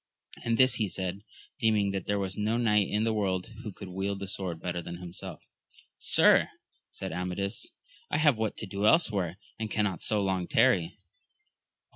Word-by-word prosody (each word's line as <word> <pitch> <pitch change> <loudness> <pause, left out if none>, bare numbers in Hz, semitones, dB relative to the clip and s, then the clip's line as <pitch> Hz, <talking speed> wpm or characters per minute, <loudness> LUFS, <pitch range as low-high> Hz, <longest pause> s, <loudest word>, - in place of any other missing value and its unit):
And 115 -1 +1
this 130 -1 +6
he 105 - +2
said, 95 +1 -3 0.4
deeming 105 -4 +3
that 95 -2 -4
there 100 - +1
was 95 -1 -3
no 110 +2 0
knight 105 -4 +3
in 105 +1 +1
the 115 0 +1
world 95 -2 -1
who 110 - -6
could 95 0 -9
wield 95 +2 -2
the 100 - -5
sword 95 -3 -4
bett^ 90 0 -3
than 85 +1 -6
himself. 90 0 -8 0.6
Sir, - - +5 0.4
answered - - -6
Amadis, 90 - -3 0.4
I - - +1
have 150 -4 +5
what 110 -1 -2
to - - -4
do 100 +1 0
elsewhere, 100 - +3 0.2
and 110 -1 -2
cannot 105 -5 0
so 105 -2 +1
long 95 -2 0
tarry. 105 -8 +3
100 Hz, 175 wpm, -29 LUFS, 95-110 Hz, 0.6 s, this